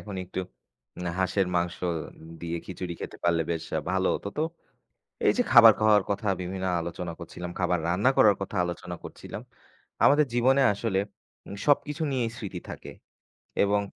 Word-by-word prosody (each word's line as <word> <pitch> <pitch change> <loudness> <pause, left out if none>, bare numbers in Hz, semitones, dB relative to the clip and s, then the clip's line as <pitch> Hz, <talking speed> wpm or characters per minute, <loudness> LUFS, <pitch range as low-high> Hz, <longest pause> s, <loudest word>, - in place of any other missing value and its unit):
এখন 100 -2 -7
একটু 95 +1 -4 0.6
উম - - -7 0.2
হাঁসের 95 +1 +1
মাংস 85 0 0 0.6
দিয়ে 85 0 -3
খিচুড়ি 90 -2 -5
খেতে - - -6
পারলে, 85 -1 +3
বেশ 80 -1 -2 0.3
ভালো 95 0 +1
হতো। - - -4
তো - - +2 0.8
এই - - +6
যে, - - +5
খাবার 115 -3 +10
খাওয়ার 105 -1 +5
কথা, 100 +1 -2
বিভিন্ন 95 +1 -4 0.2
আলোচনা 85 +1 -5
করছিলাম, 90 +1 -7
খাবার 90 -1 +1
রান্না 100 +9 +3
করার 105 -2 +6
কথা 100 - -5
আলোচনা 90 0 -5
করছিলাম। - - -8 0.6
আমাদের 150 +1 +5
জীবনে 130 +3 +4
আসলে 100 -2 -1 0.5
উম - - -6
সবকিছু 150 +2 +2
নিয়েই 120 -3 0
স্মৃতি 100 -7 -6
থাকে। - - -8 0.7
এবং 100 0 +2
95 Hz, 155 wpm, -27 LUFS, 90-115 Hz, 0.8 s, খাবার